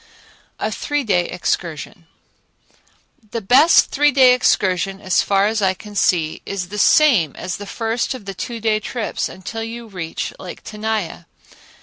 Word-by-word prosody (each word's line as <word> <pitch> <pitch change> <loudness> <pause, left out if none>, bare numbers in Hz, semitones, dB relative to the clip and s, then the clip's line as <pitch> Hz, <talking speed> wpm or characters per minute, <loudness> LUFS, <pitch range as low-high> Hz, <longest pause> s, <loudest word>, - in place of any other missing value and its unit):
A - - -2
Three 290 -1 -2
Day 180 -6 +1
Excursion 170 -2 -4 1.2
The 230 - -3
best 260 - +5
three 295 +1 +3
day 260 -2 +6
excursion, 195 -5 +1
as 185 -2 +1
far 200 0 +2
as 215 +1 0
I 190 -1 +2
can 210 +2 -12
see, 170 -5 +1
is 185 -3 -5
the 210 +1 -5
same 210 - +4
as 185 - -5
the 205 - -9
first 230 +5 -2
of 220 - -11
the 195 - -5
two 235 +4 -6
day 220 -1 +1
trips 225 +1 -3
until 190 +5 -7
you 230 +1 -6
reach 180 -7 -5
Lake 180 - -9
Tenaya. 210 -5 -4
210 Hz, 155 wpm, -20 LUFS, 185-230 Hz, 1.2 s, day